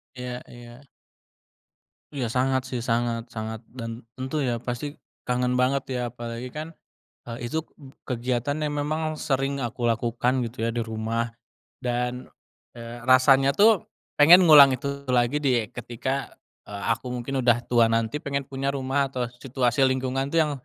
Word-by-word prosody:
Iya 125 Hz, 0 st, -6 dB
iya. 120 Hz, +3 st, -13 dB, 1.3 s
Iya, 130 Hz, -5 st, -2 dB
sangat 130 Hz, +2 st, 0 dB
sih, 125 Hz, -2 st, -3 dB
sangat 115 Hz, 0 st, -1 dB
sangat. 110 Hz, 0 st, -5 dB
Dan 115 Hz, -1 st, -7 dB
tentu 130 Hz, +3 st, -2 dB
ya, 120 Hz, -2 st, -1 dB
pasti 125 Hz, +4 st, -4 dB, 0.3 s
kangen 125 Hz, 0 st, 0 dB
banget 130 Hz, +2 st, +1 dB
ya, 125 Hz, -1 st, -2 dB
apalagi 120 Hz, +1 st, -6 dB
kan, 155 Hz, +2 st, -7 dB, 0.5 s
eee, 120 Hz, +1 st, -5 dB
itu 160 Hz, +7 st, -2 dB, 0.5 s
kegiatan 125 Hz, +3 st, -1 dB
yang 150 Hz, -1 st, -2 dB
memang 155 Hz, +1 st, -1 dB
sering 135 Hz, -1 st, -1 dB
aku 120 Hz, 0 st, -3 dB
lakukan 120 Hz, +2 st, +1 dB
gitu 115 Hz, 0 st, -4 dB
ya, 115 Hz, -, 0 dB
di 120 Hz, -, -1 dB
rumah. 115 Hz, +1 st, -2 dB, 0.5 s
Dan, 125 Hz, 0 st, -2 dB, 0.5 s
eee, 115 Hz, +1 st, -8 dB
rasanya 135 Hz, +2 st, +5 dB
tuh 210 Hz, +4 st, +4 dB, 0.3 s
pengen 175 Hz, +5 st, +8 dB
ngulang 140 Hz, -3 st, +9 dB
itu 140 Hz, +1 st, -3 dB
lagi 125 Hz, +4 st, +2 dB
di 120 Hz, -5 st, +2 dB
ketika, 125 Hz, +3 st, -3 dB, 0.3 s
eee 100 Hz, -1 st, -8 dB
aku 125 Hz, +2 st, -7 dB
mungkin 125 Hz, +1 st, -3 dB
udah 120 Hz, -1 st, +5 dB
tua, 115 Hz, -2 st, +4 dB
nanti 115 Hz, +2 st, 0 dB
pengen 140 Hz, -1 st, -2 dB
punya 135 Hz, +1 st, -2 dB
rumah 135 Hz, 0 st, -1 dB
atau 125 Hz, -2 st, -2 dB
situasi 130 Hz, 0 st, +1 dB
lingkungan 130 Hz, +1 st, 0 dB
tuh 165 Hz, -, +3 dB
yang 150 Hz, -2 st, +2 dB
125 Hz, 150 wpm, -25 LUFS, 120-140 Hz, 1.3 s, ngulang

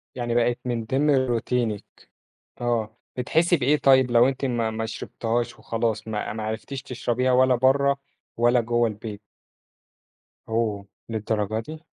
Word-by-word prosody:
يعني 120 Hz, -1 st, -2 dB
بَقِت 120 Hz, 0 st, +2 dB
من 120 Hz, -2 st, -2 dB
ضمن 140 Hz, +5 st, +2 dB
روتينِك 120 Hz, -4 st, 0 dB, 0.8 s
آه، 115 Hz, -2 st, -1 dB, 0.2 s
بتحسّي 170 Hz, +7 st, +2 dB
بإيه 145 Hz, +2 st, +3 dB
طيّب 130 Hz, -3 st, +4 dB
لو 120 Hz, +1 st, +6 dB
أنتِ 135 Hz, +1 st, -2 dB
ما 120 Hz, -3 st, 0 dB
ما 110 Hz, 0 st, -3 dB
شربتيهاش 115 Hz, +1 st, -3 dB
وخلاص 115 Hz, -1 st, -2 dB
ما 105 Hz, -1 st, -3 dB
ما 110 Hz, 0 st, -5 dB
عرفتيش 110 Hz, +5 st, -4 dB
تشرَبيها 125 Hz, -1 st, -1 dB
ولا 130 Hz, 0 st, +5 dB
برّه 140 Hz, +2 st, +3 dB, 0.4 s
ولا 120 Hz, +1 st, +4 dB
جوّه 120 Hz, 0 st, +1 dB
البيت؟ 105 Hz, -1 st, -6 dB, 1.3 s
أوه! 110 Hz, -3 st, -1 dB, 0.2 s
للدرجة 110 Hz, -1 st, -1 dB
دي؟ 155 Hz, +7 st, -9 dB
120 Hz, 135 wpm, -24 LUFS, 110-130 Hz, 1.3 s, لو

